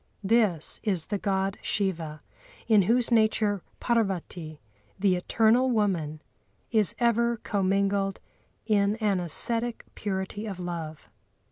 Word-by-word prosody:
This 200 -6 +1
is 185 -7 -1
the 205 - -3
God 195 -1 -1
Shiva, 165 -7 -2 0.4
in 215 -3 +5
whose 235 +6 +2
nature 215 -3 +2 0.2
Parvati, 185 -8 -2 0.4
the 195 -1 +2
eternal 225 +7 +2
Woman, 175 -10 -1 0.5
is 215 -5 +3
ever 235 0 +2
commingled 195 -1 0 0.5
in 205 -2 +2
an 210 -4 0
ascetic 230 +8 +1
purity 200 +1 -4
of 195 -3 -6
love. 165 -4 -6
200 Hz, 110 wpm, -27 LUFS, 180-220 Hz, 0.5 s, in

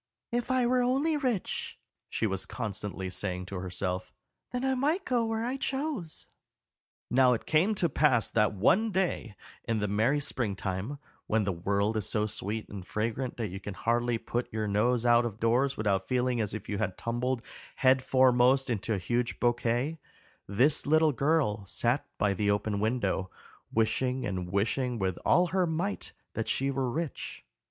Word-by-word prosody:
"If 240 +1 -1
I 255 -1 +3
were 250 +1 +3
only 270 +6 +2
rich," 255 -9 -2 0.3
she - - -1
was 95 -3 -2
constantly 100 -4 -4
saying 90 -1 -3
to 95 +1 -6
herself, 90 0 -3 0.4
"then 250 +1 -2
I 265 - +2
might 305 +9 0
go 240 -5 +1
where 225 0 -1
I 255 +3 -2
chose." 270 - -3 0.9
Now 130 0 +5
it 115 - -3
came 180 +8 +3
to 180 - +2
pass 135 -6 +3
that 105 -1 +3
one 180 - +3
day 180 - -1 0.3
in 115 - -1
the 105 -1 0
merry 110 +8 +2
spring 120 -8 -2
time, 95 +8 -3 0.3
when 110 0 +2
the 100 - 0
world 100 +5 0
is 105 - -1
so 105 -1 +1
sweet 105 +1 -4
and 100 -2 -7
fragrant 115 +6 -2
that 115 -4 -2
you 95 +2 -6
can 100 -1 -7
hardly 120 +2 +1
put 120 +2 -3
your 110 -1 -2
nose 115 +4 +2
out 120 0 +5
of 110 -3 -4
doors 125 +4 +2
without 100 -3 0
feeling 125 -2 +1
as 105 0 -2
if 110 - -7
you 100 -2 -2
had 95 -4 -2
tumbled 120 +1 -1 0.3
head 130 0 +4
foremost 130 0 +4
into 110 0 -1
a - - -1
huge 120 +6 -1
bouquet, 120 +5 +1 0.5
this 130 +11 +2
little 155 +1 +5
girl 140 -7 +1
sat 120 +8 0
by 105 -2 +2
the 100 +2 0
open 100 0 0
window, 100 -4 0 0.4
wishing 125 +3 +1
and 90 -3 -3
wishing 120 +5 0
with 95 -4 -1
all 180 - +4
her 185 0 +2
might 175 +6 -2 0.2
that 115 0 -3
she 135 +4 +1
were 135 -2 -1
rich. 155 +3 -4
120 Hz, 175 wpm, -29 LUFS, 105-150 Hz, 0.9 s, Now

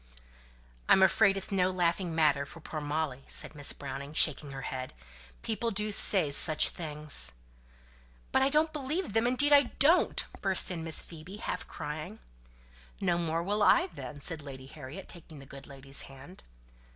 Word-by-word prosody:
"I'm 190 - +7
afraid 195 +1 +4
it's 195 - -2
no 185 -2 +2
laughing 175 -1 0
matter 150 -3 +3
for 165 +4 -11
poor 155 -1 -6
Molly," 145 -2 -2
said - - -4
Miss 145 -2 +1
Browning, 140 +1 -7
shaking 150 - +2
her 135 -1 -7
head. 130 0 -5 0.5
"People 230 +1 -2
do 210 0 -1
say 190 -6 +3
such 155 +2 +4
things!" 150 - -2 1.0
"But - - +3
I 265 - +3
don't 310 +2 +2
believe 300 - -3
them; 225 +2 +2
indeed 290 +4 +3
I 285 -1 +7
don't," 320 +6 +4 0.2
burst 190 -1 +2
in 165 -2 -4
Miss 160 -1 +1
Phoebe, 170 +4 -10
half - - -4
crying. 150 -6 -6 0.8
"No 175 -3 +1
more 165 0 -1
will 205 +3 -1
I, 350 - +5
then," 145 - -8
said 160 +1 -2
Lady 135 -2 -9
Harriet, 145 +6 -10
taking 165 -3 -9
the 135 - -11
good 140 0 -11
lady's 135 0 -4
hand. 135 +7 -11
165 Hz, 165 wpm, -30 LUFS, 145-200 Hz, 1.0 s, I'm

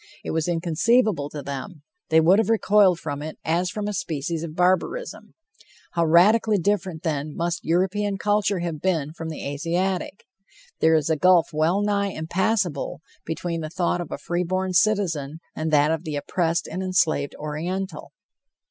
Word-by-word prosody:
It - - -4
was 160 0 -1
inconceivable 175 - +1
to 150 -1 -7
them; 140 +4 -7 0.3
they 160 - +5
would 175 +6 +5
have 225 - +1
recoiled 205 -5 +4
from 145 -2 -5
it 155 +1 -6
as 175 +3 +1
from 210 +1 -4
a 210 - -2
species 160 -2 -3
of 160 -2 -6
barbarism. 185 - -1 0.6
How 170 -1 +1
radically 210 +6 +5
different, 190 -3 -1
then, 150 -1 -2
must 170 0 -2
European 195 +4 0
culture 205 -2 +1
have 165 -4 -4
been 160 -6 0
from 165 -1 -6
the 155 - -6
Asiatic. 175 +7 -2 0.5
There 160 0 +4
is 155 0 +1
a - - +3
gulf 180 +1 +4
well 165 +6 +2
nigh 200 -1 +1
impassible 175 -1 -1 0.3
between 165 +1 -3
the 155 - -5
thought 175 +1 -1
of 170 - -7
a - - -3
free 175 +5 -2
born 185 +1 -1
citizen 170 -7 +1 0.2
and 155 +1 -2
that 150 0 +4
of 160 0 -2
the 155 -3 -4
oppressed 165 +3 -1
and 185 - -4
enslaved 170 -6 +1
Oriental. 175 +6 -4
170 Hz, 165 wpm, -24 LUFS, 155-190 Hz, 0.6 s, they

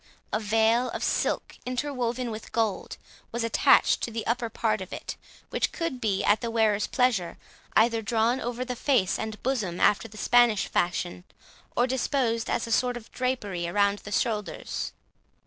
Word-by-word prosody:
A 215 - +2
veil 225 +3 +2
of - - -3
silk, - - -1
interwoven 250 -2 -2
with 215 0 -8
gold, 225 -4 -1 0.3
was 235 0 -2
attached 230 - +4
to - - -2
the 225 -1 -4
upper 235 0 0
part 215 -1 0
of 185 - -7
it, - - -5 0.4
which - - 0
could 330 -7 -3
be, 200 -3 0
at 205 +1 +3
the 235 - -2
wearer's 220 -2 +2
pleasure, 240 -10 +1 0.4
either 225 +1 +4
drawn 230 +4 +1
over 245 +1 -3
the 250 -1 -3
face 245 -7 +1
and 220 -1 -5
bosom 215 -10 -1
after 210 +2 +3
the 215 0 -13
Spanish 240 -2 +4
fashion, 175 0 -1 0.5
or 245 - +4
disposed 250 -3 0
as 235 - 0
a 230 - -6
sort 245 +2 +2
of 230 -1 -12
drapery 205 -9 -2
round 200 +2 +2
the 205 - -10
shoulders. 210 -1 -2
230 Hz, 165 wpm, -27 LUFS, 210-245 Hz, 0.5 s, attached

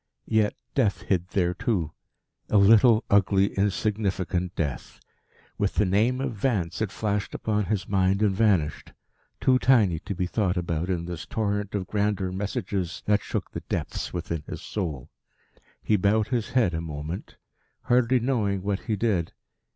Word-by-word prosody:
Yet 110 -2 +1 0.2
Death 110 -8 +1
hid 90 -2 0
there 90 -2 0
too 90 -5 -1 0.6
a 105 - +4
little, 110 +3 +6
ugly, 100 0 +3
insignificant 95 -3 -1
death. 70 -6 -4 0.6
With 100 -1 0
the 105 - +3
name 110 +7 +2
of 135 -2 -2
Vance 100 -5 -1
it 105 -3 -1
flashed 105 -2 -2
upon 105 -2 0
his 95 -1 -2
mind 95 +1 +2
and 100 -2 +2
vanished, 95 -8 +1 0.5
too 130 -1 +3
tiny 105 -12 +4
to 100 - -5
be 90 - -1
thought 95 -1 0
about 85 0 -2
in 85 -2 -1
this 85 -2 -6
torrent 105 -2 -2
of 95 -2 -2
grander 100 -2 -1
messages 95 -2 -3
that 105 0 +3
shook - - -4
the - - -5
depths - - -3
within 85 -2 -3
his - - -7
soul. 80 - -4 0.7
He 105 - +3
bowed 105 +2 +2
his 120 -4 -1
head 115 -9 +2
a 80 - -2
moment, 80 +2 -6 0.5
hardly 125 +1 +3
knowing 110 -6 0
what 100 -1 -1
he 110 - -2
did. 100 -6 0
100 Hz, 160 wpm, -26 LUFS, 90-110 Hz, 0.7 s, little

